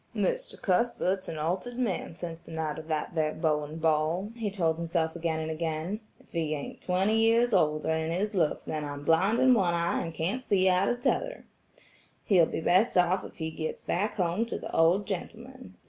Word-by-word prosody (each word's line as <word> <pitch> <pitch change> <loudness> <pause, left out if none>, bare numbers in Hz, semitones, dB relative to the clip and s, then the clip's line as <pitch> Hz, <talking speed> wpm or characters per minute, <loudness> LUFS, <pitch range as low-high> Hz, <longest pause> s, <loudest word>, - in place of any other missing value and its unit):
"Mr. - - -1
Cuthbert's 190 -2 0
an 160 - -5
altered 185 +10 -2
man 210 -9 -2
sense 170 -1 -6
the - - -16
night 160 -1 -3
of 155 - -10
that 155 +2 -2
there 155 -2 0
Bowen 150 -1 -1
ball," 160 +5 +1
he 225 -3 -2
told 165 -5 0
himself 165 -1 -1
again 165 -2 -1
and 160 0 -3
again, 160 +5 -3 0.2
"if - - -23
he 160 -2 -1
ain't 145 - -7
twenty 190 +4 +1
years 230 +1 +4
older 155 -4 +2
in 160 0 -1
his 205 +5 -1
looks 165 -6 +1
then 155 -1 -3
I'm 145 0 -6
blind 190 +9 +3
in 260 0 +5
one 185 -7 +2
eye 170 0 0
and 165 - -4
can't 175 +11 -2
see 190 -5 +2
out 185 +1 +3
of 245 0 -2
'tother. - - -1 0.8
He'll 175 -5 +5
be - - -3
best 185 +7 +3
off 180 +1 +3
if - - -10
he 160 -1 -4
gets 155 0 -5
back 210 +4 -1
home 185 +4 0
to - - -3
the - - -7
old 175 +5 +4
gentleman. 230 +4 -7
175 Hz, 200 wpm, -29 LUFS, 160-205 Hz, 0.8 s, in